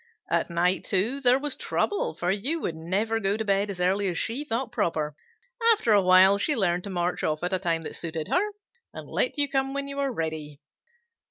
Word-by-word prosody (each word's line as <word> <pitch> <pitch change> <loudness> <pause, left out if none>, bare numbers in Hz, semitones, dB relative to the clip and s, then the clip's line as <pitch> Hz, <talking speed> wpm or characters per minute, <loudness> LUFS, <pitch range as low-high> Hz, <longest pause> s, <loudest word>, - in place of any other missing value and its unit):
At - - +1
night, 175 +2 +1
too, 220 +8 -1
there 250 -1 +5
was 285 0 -2
trouble, 410 - -1
for 175 +2 -1
you 255 +12 -1
would 165 - -3
never 200 +8 -1
go 200 0 0
to 220 - -3
bed 200 0 +1
as 190 -3 -6
early 190 +3 +1
as 175 -3 -2
she 245 +6 -1
thought 240 -3 -3
proper. 150 -3 -1 0.6
After 240 - 0
a 205 -1 +6
while 185 +2 +6
she 295 +8 +4
learned 180 -5 0
to - - -6
march 175 -1 -2
off 155 +1 -1
at 180 +2 -1
a 185 - +2
time 165 -3 -1
that - - -7
suited 160 -2 -4
her, 405 +4 +1 0.5
and - - -8
let - - -1
you 290 -1 +3
come 270 0 -1
when 280 0 -3
you 280 0 -6
were 275 -1 0
ready." 155 - -4
195 Hz, 220 wpm, -26 LUFS, 175-260 Hz, 0.6 s, a